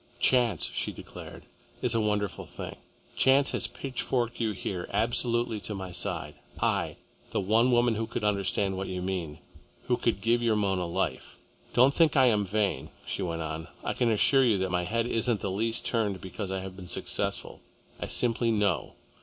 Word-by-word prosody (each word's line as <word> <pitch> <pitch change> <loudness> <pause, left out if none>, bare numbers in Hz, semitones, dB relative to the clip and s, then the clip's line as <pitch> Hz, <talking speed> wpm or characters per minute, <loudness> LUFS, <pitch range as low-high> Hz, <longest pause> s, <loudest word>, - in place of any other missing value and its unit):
"Chance," 120 -3 +3
she - - -1
declared, - - -10 0.4
"is - - +2
a 115 - +2
wonderful 105 -3 -1
thing. - - -7 0.4
Chance 135 +1 +4
has - - +1
pitchforked 125 -2 -2
you 115 -2 +1
here, 90 -2 -4
absolutely 115 +1 +1
to 105 +1 -5
my 95 -1 -5
side, - - -3 0.3
I, - - +1 0.3
the - - -1
one 110 +6 +3
woman 120 -1 +4
who 110 +1 -2
could 115 -1 -4
understand 100 -1 +1
what 95 - -3
you 90 - -3
mean, 90 -5 -3 0.5
who - - +1
could - - 0
give 115 +2 +3
your 115 -2 +3
Mona 95 -4 +1
life. 85 - -2 0.4
Don't 130 +3 +6
think 160 -2 +4
I 130 - +7
am 105 -4 +4
vain," 100 0 0 0.2
she - - -2
went 85 -3 -2
on. 80 +1 -4 0.2
"I - - -1
can 120 - +1
assure 135 +5 +4
you 115 -5 +4
that 95 -1 -1
my 90 -1 +1
head 115 +4 0
isn't 115 -2 0
the 100 - -2
least 115 +4 -1
turned 105 -5 0
because 95 +2 -5
I 95 0 -2
have 95 0 -7
been 95 -1 -9
successful. - - -2 0.4
I - - -3
simply 115 -1 +1
know. 105 -5 +1
105 Hz, 185 wpm, -29 LUFS, 95-120 Hz, 0.5 s, I